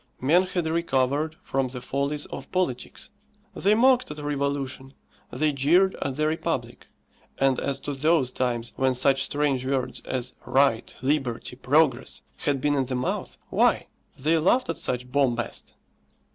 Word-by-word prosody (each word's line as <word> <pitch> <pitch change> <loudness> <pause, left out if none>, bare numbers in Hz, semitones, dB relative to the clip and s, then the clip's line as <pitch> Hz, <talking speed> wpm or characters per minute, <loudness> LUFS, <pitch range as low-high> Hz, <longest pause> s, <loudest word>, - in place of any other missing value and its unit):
Men 155 +8 +4
had 180 -2 -2
recovered 155 -1 0
from 135 -1 0
the 125 0 -7
follies 140 +3 -2
of - - -9
politics. 180 -10 -3 0.4
They 205 +2 +2
mocked 255 +2 +4
at 150 - -7
revolution, 140 -2 -3 0.4
they 150 +4 +1
jeered 170 +8 +3
at 135 -2 -2
the 155 +2 0
republic, 155 +1 -2 0.5
and 135 -2 +2
as 140 -1 -2
to 145 - -4
those 145 -2 +2
times 120 -2 -2
when 130 -1 +2
such 135 +1 +3
strange 140 -3 0
words 130 -1 -1
as 130 -1 -4
Right, 135 -4 +2
Liberty, 130 -4 -1
Progress, 135 -1 +1
had 140 -2 0
been 145 +2 +1
in 135 -3 0
the 130 - -2
mouth 125 +1 -3
why, - - +2 0.3
they 160 +4 +2
laughed 215 +9 +2
at 165 - -2
such 125 0 -2
bombast! 125 -4 -1
140 Hz, 150 wpm, -25 LUFS, 130-155 Hz, 0.5 s, Men